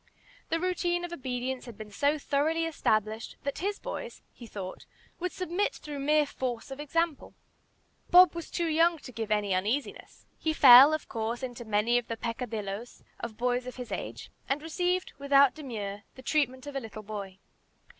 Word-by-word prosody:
The 330 - +1
routine 350 -1 0
of 345 - -7
obedience 255 -3 -4
had 230 -4 -10
been 215 -1 -9
so 285 +8 +1
thoroughly 305 +3 0
established, 220 -8 -1
that 280 +1 -3
his 400 +4 -1
boys, - - -7
he 235 - -11
thought, 190 -4 -7 0.3
would 360 0 -2
submit 365 +2 -1
through 295 -2 -7
mere 300 +2 +3
force 255 -3 -4
of 270 - -7
example. 320 +1 -1 0.7
Bob 360 0 +8
was 335 -1 -6
too 345 - -1
young 330 +1 +3
to 275 -3 -11
give 225 -2 -4
any 210 -2 +1
uneasiness. 215 +10 -2
He 315 - 0
fell, 270 0 +10
of 310 - -7
course, 230 +3 -3
into 245 -2 -5
many 220 +3 +2
of 240 - -10
the 230 - -4
peccadilloes 230 -2 -5 0.2
of 225 -2 -6
boys 245 +1 0
of 255 - -6
his 250 -2 -7
age, - - -5 0.2
and 275 +2 +1
received, 360 +3 -1
without 280 -1 +5
demur, 210 -9 -5
the 260 - -12
treatment 260 -2 0
of 285 -1 -7
a - - 0
little 220 -3 -9
boy. 200 -3 -6
260 Hz, 175 wpm, -29 LUFS, 225-315 Hz, 0.7 s, fell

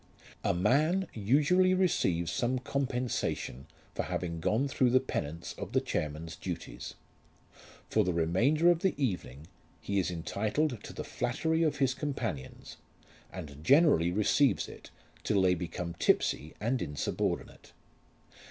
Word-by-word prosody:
A - - +2
man 145 - +2
usually 150 - +3
receives 95 - +1
some 125 +1 0
compensation 125 - -2 0.3
for - - -1
having 85 -2 -3
gone 110 +11 +1
through 130 -2 +2
the 130 +2 +5
penance 85 - -4
of - - -6
the - - +4
chairman's 80 +2 -3
duties. 90 -1 -6 0.9
For 110 - +2
the 90 - 0
remainder 115 - +3
of 170 - +1
the 190 +1 +1
evening 85 - -3 0.3
he 100 0 -1
is 90 - 0
entitled 110 - -1
to - - -7
the - - -5
flattery 160 +6 -1
of 155 -3 +1
his 135 -2 +2
companions, 120 - -5 0.5
and 75 -5 -8
generally 135 - +5
receives 110 +4 +2
it - - -12 0.3
till 100 - +2
they 90 -1 +5
become 85 0 -4
tipsy 80 -3 +1
and 120 +3 0
insubordinate. 75 -4 -3
110 Hz, 135 wpm, -31 LUFS, 85-140 Hz, 0.9 s, the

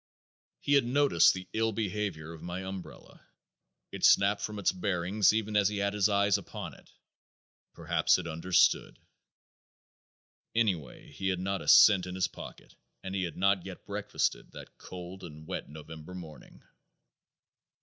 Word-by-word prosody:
He 145 - 0
had 140 -2 +5
noticed 130 - +4
the 95 -1 -7
ill 115 0 +1
behavior 100 -7 -3
of 80 - -12
my 90 +2 -5
umbrella. 95 -1 -10 0.7
It - - -8
snapped 100 +1 +5
from 105 -1 -4
its 100 - +1
bearing 95 +1 -3
even 110 -1 -2
as 100 -1 +4
he 105 - -4
had 100 0 0
his 105 0 +2
eyes 100 -1 +2
upon - - -8
it. - - -18 0.9
Perhaps - - +2
it 90 - -6
understood. 85 +2 +1 1.6
Anyway 90 - -1
he 95 +6 -4
had 95 -2 0
not 95 +1 -2
a - - -9
cent 95 -4 +7
in 90 - -6
his 95 -1 +1
pocket - - -12 0.3
and 95 - -6
he 95 - -1
had 85 -4 -4
not 100 -1 +2
yet 95 -1 -10
breakfasted 105 +1 -2
that - - -12
cold 90 +1 -9
and 80 -2 -10
wet - - -5
November 80 +3 -10
morning. 80 -4 -12
95 Hz, 155 wpm, -30 LUFS, 90-105 Hz, 1.6 s, cent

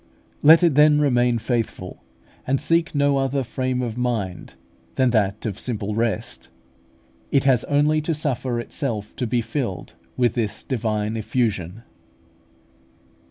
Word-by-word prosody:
Let 160 +4 +7
it 170 -4 +4
then 150 +1 +5
remain 125 -4 +2
faithful, 115 -6 -3 0.4
and 135 0 +1
seek 165 +2 +1
no 140 -1 +2
other 135 0 0
frame 130 +1 -2
of 120 0 -4
mind 110 -8 -3 0.4
than 130 -2 +2
that 105 -3 0
of 105 -4 -3
simple 105 -4 -3
rest. 115 +1 -2 0.8
It 135 - +2
has 130 -4 +3
only 150 +2 +2
to 160 +1 -1
suffer 130 -5 -1
itself 115 -4 -4
to 125 - -1
be 120 +1 0
filled 115 -5 -4 0.2
with 120 -3 +2
this 110 -4 -2
divine 110 -3 -2
effusion. 110 -3 -2
125 Hz, 135 wpm, -22 LUFS, 110-140 Hz, 0.8 s, Let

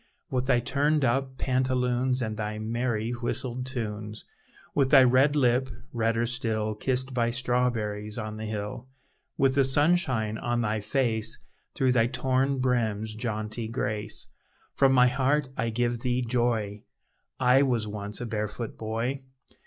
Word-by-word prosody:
With 130 0 -1
thy 125 -2 +4
turned 145 +4 +1
up 130 +2 0
pantaloons, 130 -1 +1
And 110 -1 -3
thy 105 0 -3
merry 115 +1 -1
whistled 125 +1 -2
tunes; 105 -4 -4 0.5
With 135 -2 +2
thy 135 -2 +8
red 130 +4 +4
lip, 130 -1 +2 0.2
redder 115 0 +1
still 110 -3 -1
Kissed 130 +4 -1
by 120 -2 +1
strawberries 120 -4 -1
on 110 -1 -5
the 110 0 -5
hill; 105 +3 -5 0.5
With 135 -1 +3
the 140 0 +4
sunshine 130 - +2
on 120 0 -1
thy 110 -1 0
face, 110 0 -1 0.4
Through 130 -1 +2
thy 120 -2 +3
torn 130 +2 0
brim's 110 -4 0
jaunty 110 0 -3
grace; 105 -2 -3 0.5
From 135 -1 +4
my 125 -1 +6
heart 135 +3 +1
I 115 +1 -1
give 120 +1 0
thee 125 +1 0
joy, 115 -4 0 0.6
I 130 +1 +5
was 120 -6 +1
once 105 0 -5
a 120 - -4
barefoot 110 0 -4
boy! 115 +5 -2
120 Hz, 145 wpm, -27 LUFS, 110-130 Hz, 0.6 s, thy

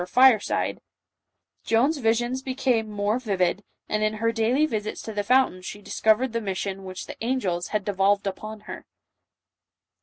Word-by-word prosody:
or 180 - -4
fireside, 255 -3 +3 0.8
Joan's 270 +7 +2
visions 240 +2 +1
became 255 -4 0
more 210 +3 0
vivid, 195 -4 0 0.2
and 215 - -1
in 215 0 +1
her 230 +1 +1
daily 235 +6 +2
visits 215 -7 -3
to 220 - -6
the 205 - 0
fountain 250 -4 +2
she 205 +3 -7
discovered 220 +4 +1
the 230 - -1
mission 195 -1 -4
which 185 0 -6
the - - -9
angels 200 -9 -1
had 210 -2 -2
devolved 200 0 +2
upon 215 +2 -5
her. - - -9
215 Hz, 155 wpm, -25 LUFS, 200-245 Hz, 0.8 s, fireside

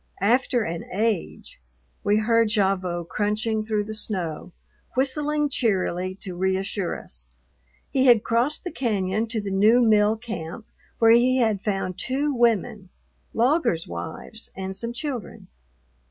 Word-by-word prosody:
After 240 +3 +2
an 165 -3 -4
age, 210 - -2 0.4
we 205 +1 +3
heard 230 +1 +3
Gavotte 190 -5 0
crunching 215 +2 -1
through 215 -1 -1
the 215 +1 -6
snow, 185 -7 -4 0.4
whistling 295 +3 +1
cheerily 185 -7 0
to 185 -2 -6
reassure 190 +1 -1
us. - - -10 0.6
He 265 -1 +3
had 235 -4 +6
crossed 235 +6 0
the 355 - -4
cañon 215 -4 -1
to 225 -1 -1
the 200 -2 -4
new 210 +5 +5
mill 215 -2 +4
camp, 215 -3 -7 0.3
where 225 -1 +5
he 250 +2 +5
had 220 -6 +1
found 195 -3 -2
two 280 +3 0
women, 220 -5 +1 0.5
loggers' 235 - +2
wives, 220 +7 -7
and 190 0 -5
some 230 +4 -3
children. 250 -2 -6
215 Hz, 135 wpm, -24 LUFS, 190-235 Hz, 0.6 s, had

